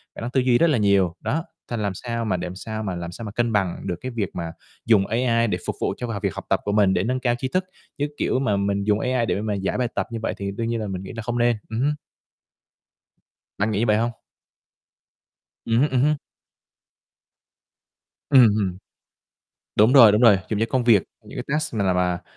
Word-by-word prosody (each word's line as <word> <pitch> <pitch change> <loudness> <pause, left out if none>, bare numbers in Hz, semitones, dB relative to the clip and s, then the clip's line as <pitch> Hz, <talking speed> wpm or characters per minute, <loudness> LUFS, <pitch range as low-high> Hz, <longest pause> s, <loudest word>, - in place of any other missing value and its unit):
khả - - -8
năng 120 - -4
tư 130 0 +2
duy 125 -1 +3
rất 170 - +4
là 145 - +2
nhiều. 100 -4 +2
Đó, 160 +4 -2 0.3
th - - -2
làm 100 -2 -1
sao 115 +2 -4
mà 95 -4 0
để - - -4
làm 90 - -7
sao 110 +2 -5
mà 95 -3 -3
làm 85 0 -5
sao 115 +6 -8
mà 105 - -6
cân 120 +1 0
bằng 95 -4 0
được 90 - -1
cái 130 - -5
việc 110 -5 -2
mà 85 -1 -4 0.3
dùng 105 -4 +4
AI 115 0 +1
để - - -1
phục - - -2
vụ - - 0
cho, 125 - -4
à, 100 - -3
việc 100 -4 0
học - - -7
tập - - +2
của 105 - -2
mình 100 -2 +3
để 90 - +1
nâng 130 +3 -1
cao 120 -2 +1
tri 130 - -2
thức, 185 +7 -1 0.3
chứ, 145 - 0
kiểu, - - 0
mà 130 -7 +1
mình 100 0 0
dùng 105 +1 +2
AI 125 -2 0
để 105 - -1
mà 105 -1 -2
giải 95 +3 -2
bài 125 - 0
tập - - -1
như 115 - -4
vậy - - -1
thì 100 0 -4
đương 115 +3 -3
nhiên 115 0 -1
là 105 - -3
mình 95 -1 -5
nghĩ - - -8
là 115 - -4
không 120 +1 -2
nên. 120 0 +3
Ừm 110 +1 -3
hứm. 145 +4 +2 1.6
Bạn 105 +2 0
nghĩ 100 - 0
như 115 - +2
vậy 105 0 +4
hông? 115 +2 0 1.5
Ừm 115 +2 +2
hứm, 150 - +3
ừm 130 -1 +1
hứm. 150 +2 +3 2.1
Ừm, 130 -5 +8
ừm. 100 -4 0 1.0
Đúng 110 +5 +5
rồi, 120 -6 +9
đúng 105 +3 +2
rồi, 110 -6 +6
dùng 105 -2 -1
cho 115 - +2
công 130 +1 +1
việc, 110 -7 +5 0.2
những - - -10
cái - - -3
task 150 -2 -1
nào 100 -4 +1
mà 90 -1 0
110 Hz, 240 wpm, -23 LUFS, 100-120 Hz, 2.1 s, rồi